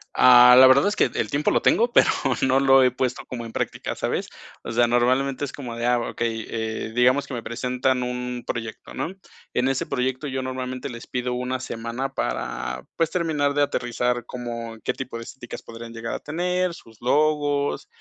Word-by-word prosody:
Ah, 125 0 +8
la 130 - +10
verdad 135 +6 +6
es 205 - 0
que - - +4
el - - -2
tiempo 145 +2 +1
lo - - +2
tengo, 235 +1 +3
pero - - +6 0.3
no 130 0 +3
lo 135 -1 +6
he 130 - +5
puesto 125 0 -3
como 120 -2 -6
en 115 - -8
práctica, - - -3
¿sabes?, - - -2 0.4
o - - -5
sea, 120 +1 +3
normalmente 130 +4 +1
es 130 - -8
como 125 -5 -7
de, 120 - -3
ah, 120 0 +3
okey, 115 -1 -3
eh, 110 -1 -3
digamos 125 +3 +3
que - - -7
me 115 - -5
presentan 125 +2 -1
un 125 0 -4
proyecto, 115 -2 -6
¿no?, 165 - -3 0.4
en 125 +1 +1
ese 135 -1 0
proyecto 130 +1 -2
yo 130 -1 -3
normalmente 130 0 -4
les 120 -1 -8
pido 125 0 -3
una 125 +1 -2
semana 120 +2 -4
para, 60 - -3
pues 165 -1 0
terminar 155 -5 0
de 145 - +1
aterrizar 120 -3 -1
como 115 -2 -6
qué - - 0
tipo 130 -3 -6
de 115 - -7
estéticas 120 +1 -9
podrían 115 0 -10
llegar 115 0 -4
a - - -4
tener 180 +3 -1
sus 115 -8 -15
logos, 145 +1 +1
125 Hz, 195 wpm, -24 LUFS, 120-135 Hz, 0.4 s, la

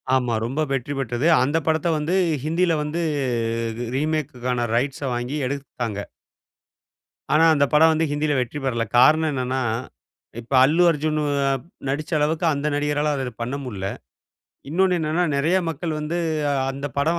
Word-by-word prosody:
ஆமா. 125 -3 +1
ரொம்ப 135 +6 -2
வெற்றி 135 +1 -2
பெற்றது. 130 +3 -1 0.2
அந்த 145 +5 +1
படத்த 160 +1 +1
வந்து 155 +5 -1 0.3
ஹிந்தியில 165 +2 +1
வந்து 160 +3 -3 0.9
ரீமேக்குக்கான 125 -5 -1
ரைட்ஸ 135 +4 -1
வாங்கி 120 +5 -3
எடுத்தாங்க. 120 -6 -4 1.3
ஆனா 160 +2 +5
அந்த 145 0 +3
படம் 160 +2 +6
வந்து 160 +1 +1
ஹிந்தியில 145 -1 0
வெற்றி 125 +4 -3
பெறல. 115 -3 0 0.2
காரணம் 155 +3 +5
என்னன்னா, 130 0 -1 0.8
இப்ப 120 +4 -8
அல்லு 165 +5 +3
அர்ஜுனு 155 0 -1 0.7
நடிச்ச 150 +4 -3
அளவுக்கு 155 +3 0
அந்த 145 +1 -2
நடிகரால 145 0 0
அத 130 -2 -4
பண்ண 125 +4 -3
முடியல. 95 -5 -4 0.8
இன்னொன்னு 185 +2 +2
என்னன்னா, 160 +3 +1
நெறைய 165 +7 +2
மக்கள் 165 0 -3
வந்து 160 +3 -2 0.5
அந்த 140 +2 -5
படம் 165 +4 +1
145 Hz, 135 wpm, -23 LUFS, 130-160 Hz, 1.3 s, படம்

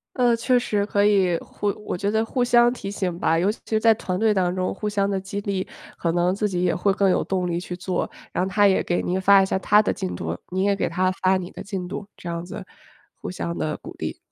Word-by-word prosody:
呃， 245 -3 +3
确 250 +2 +2
实， 210 -4 0
可 205 -1 +2
以 190 -5 +3
互 205 - -5 0.2
我 - - -2
觉 200 +3 -1
得 220 +1 +1
互 250 +2 0
相 240 0 +5
提 200 -5 -6
醒 185 -4 -3
吧， 165 -1 +2
尤 185 +5 +2
其 220 - 0
在 225 0 +5
团 185 -3 -3
队 220 -1 +3
当 180 -2 +1
中 185 0 -1
互 210 +2 -3
相 200 -1 0
地 195 - 0
激 195 +1 -5
励， 195 -2 -2 0.3
可 170 - 0
能 175 +1 +2
自 210 +1 -1
己 180 -1 -1
也 175 - +2
会 200 +3 +2
更 195 -1 +2
有 - - +2
动 185 -2 -1
力 170 0 -1
去 180 0 -6
做， 180 0 -2 0.2
然 - - 0
后 190 - -2
他 205 +2 +4
也 190 - +3
给 175 - 0
您 185 +1 -1
发 200 +1 +6
一 190 - +3
下 190 - 0
他 210 +2 +5
的 215 - 0
进 90 -1 -4
度， 80 -1 -3
你 185 +1 -1
也 200 0 +2
给 - - -1
他 185 +2 +1
发 190 0 +4
你 180 -1 -6
的 - - -9
进 190 -3 -5
度， 200 +2 -6
这 - - -10
样 170 0 -3
子 175 - -8 0.6
互 - - -5
相 85 -1 -4
地 80 -1 -2
鼓 - - -11
励。 - - -4
190 Hz, 285 characters per minute, -23 LUFS, 180-205 Hz, 0.6 s, 发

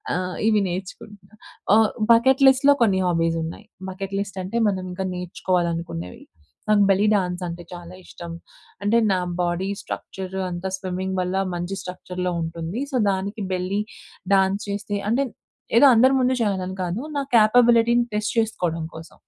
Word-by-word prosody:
ఆహ్, 180 0 -3
ఇవి 215 -1 +4
నేర్చుకుంటున్నాను. 195 +3 -8 0.4
ఆహ్, 220 -1 +5 0.2
బకెట్ 265 +4 +5
లిస్ట్‌లో 265 +2 +6
కొన్ని 200 -5 +4
హాబీస్ 165 -1 +1
ఉన్నాయి. 165 +6 -7 0.2
బకెట్ 195 +1 -6
లిస్ట్ 200 -1 -5
అంటే 200 +6 -3
మనం 185 -2 -3
ఇంకా 190 +1 -3
నేర్చుకోవాలనుకునేవి 170 - -3 0.5
నాకు 205 -1 +5
బెల్లీ 195 +2 +3
డాన్స్ 180 -2 -1
అంటే 170 +1 -7
చాలా 175 0 -9
ఇష్టం. 170 -1 -9 0.5
అంటే 220 +3 +3
నా 185 - +2 0.2
బాడీ 175 +2 -1
స్ట్రక్చర్ 190 0 -7
అంతా 175 +2 -4
స్విమ్మింగ్ 190 0 -4
వల్ల 180 +1 -2 0.2
మంచి 175 +3 -3
స్ట్రక్చర్‌లో 180 0 -4
ఉంటుంది. 165 +7 -4
సో, 265 - -3 0.2
దానికి 200 +3 -3
బెల్లీ 185 +3 -1 0.5
డాన్స్ 195 +1 +2
చేస్తే, 205 0 -3
అంటే 270 +5 +2 0.5
ఏదో 265 - +7
అందరి 255 +4 +5
ముందు 255 0 +2
చేయాలి 200 -4 0
అని 190 - -6
కాదు. 180 +6 -3 0.2
నా 280 - +1
కేపబిలిటీని 235 +1 +5
టెస్ట్ 210 +1 -1
చేసుకోవడం 175 -7 -1
కోసం 160 +1 -11
190 Hz, 150 wpm, -23 LUFS, 180-215 Hz, 0.5 s, ఏదో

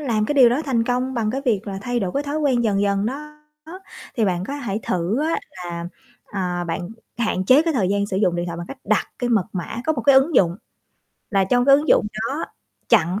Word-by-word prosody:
làm 225 -7 0
cái 295 - -1
điều 255 -4 +7
đó 250 +6 +1
thành 235 -5 +1
công 255 +2 -1
bằng 220 -2 0
cái 270 - -2
việc 220 -5 0
là 195 -1 -4
thay 245 0 -1
đổi 185 -3 -2
cái 280 - 0
thói 290 +1 -3
quen 260 -6 +1
dần 200 -2 +1
dần 200 0 +1
đó, 300 +4 -6 0.8
thì 225 - +2
bạn 180 -2 0
có 275 - -5
hãy 225 -7 -3
thử 185 +9 -1
á 320 +1 0
là, 175 -2 -6 0.4
à, 180 -3 -3
bạn 175 +1 -4 0.3
hạn 220 -5 0
chế 260 +9 +6
cái 330 0 0
thời 195 -7 +1
gian 200 0 0
sử 190 - -3
dụng 180 -4 +2
điện 175 0 -2
thoại 170 -1 -5
bằng 175 - -6
cách 275 - -9
đặt - - +1
cái 245 -1 -1
mật 215 -6 +3
mã. 185 +3 -5
Có 315 - +3
một 265 - -3
cái 280 - +5
ứng 270 +5 +4
dụng 175 0 +3 0.7
là 195 -2 +3
trong 245 +5 +2
cái 275 +1 +7
ứng 295 +2 -3
dụng - - +4 0.2
đó 285 +4 -3 0.4
chặn 180 +5 +3
220 Hz, 245 wpm, -22 LUFS, 190-270 Hz, 0.8 s, điều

